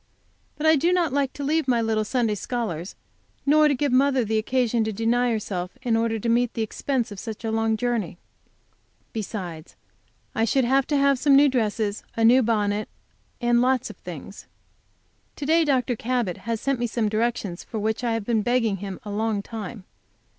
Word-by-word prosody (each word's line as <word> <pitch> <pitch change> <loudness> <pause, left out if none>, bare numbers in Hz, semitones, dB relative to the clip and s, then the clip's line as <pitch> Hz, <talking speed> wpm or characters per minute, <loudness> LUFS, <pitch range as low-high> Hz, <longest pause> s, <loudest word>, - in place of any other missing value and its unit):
But 305 - -3
I 315 0 +6
do 335 +5 +2
not 345 -6 +1
like 275 -2 +1
to 285 - -6
leave 310 +1 +1
my 245 -2 +3
little 220 -1 +1
Sunday 230 -1 0
scholars, 205 -5 -4 0.5
nor 305 +2 +5
to 285 - +2
give 285 +1 0
mother 260 -1 +3
the 220 +1 +1
occasion 240 0 +1
to 220 - -1
deny 230 +4 +1
herself 190 -5 -3
in 235 -3 +1
order 225 0 +1
to 220 - -4
meet 240 +1 +2
the 225 - 0
expense 240 +1 -2
of 200 - -7
such 225 +1 -7
a 220 - -1
long 225 0 +1
journey. 235 -8 -2 1.0
Besides, 185 -7 -6 0.6
I 225 - 0
should 250 +3 +2
have 265 +2 +2
to 295 - +1
have 275 -1 +3
some 280 0 +5
new 285 +1 +7
dresses, 215 -4 -1 0.2
a 225 - +3
new 250 +3 +6
bonnet, 210 -2 0 0.5
and 240 0 +3
lots 255 0 +1
of - - -16
things. - - -9 0.9
To 290 - -5
day 325 +3 +4
Dr. 255 -5 +1
Cabot 235 -6 -1
has 230 -1 0
sent 275 0 -1
me 240 - 0
some 225 -1 -1
directions 215 -4 -1
for 225 - -7
which 220 +3 -1
I 235 -1 +1
have 225 -2 -2
been 225 -1 +1
begging 230 -3 +1
him 195 0 -6
a 210 - -6
long 210 -1 -1
time. 215 -2 -7
230 Hz, 195 wpm, -24 LUFS, 215-260 Hz, 1.0 s, new